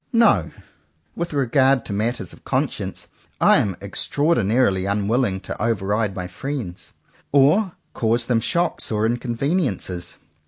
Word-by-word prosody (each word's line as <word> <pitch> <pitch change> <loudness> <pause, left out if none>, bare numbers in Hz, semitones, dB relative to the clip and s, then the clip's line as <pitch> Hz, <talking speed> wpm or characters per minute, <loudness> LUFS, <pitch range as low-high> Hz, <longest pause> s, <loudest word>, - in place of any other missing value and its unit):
No: 230 0 +4 0.7
with 170 0 -3
regard 135 -2 +2
to - - -4
matters 110 -2 -2
of - - -17
conscience, - - -2 0.3
I - - +6
am 95 -3 0
extraordinarily 110 - +1
unwilling 100 +1 0
to 90 - -6
over 110 -3 0
ride 105 0 0
my 90 - -4
friends, 95 -1 -6 0.4
or 155 +8 +4 0.2
cause 115 0 +1
them 120 -2 +2
shocks 170 +6 0
or 105 0 +1
in 120 +2 +1
conveniences. 120 - -2
115 Hz, 130 wpm, -22 LUFS, 100-140 Hz, 0.7 s, I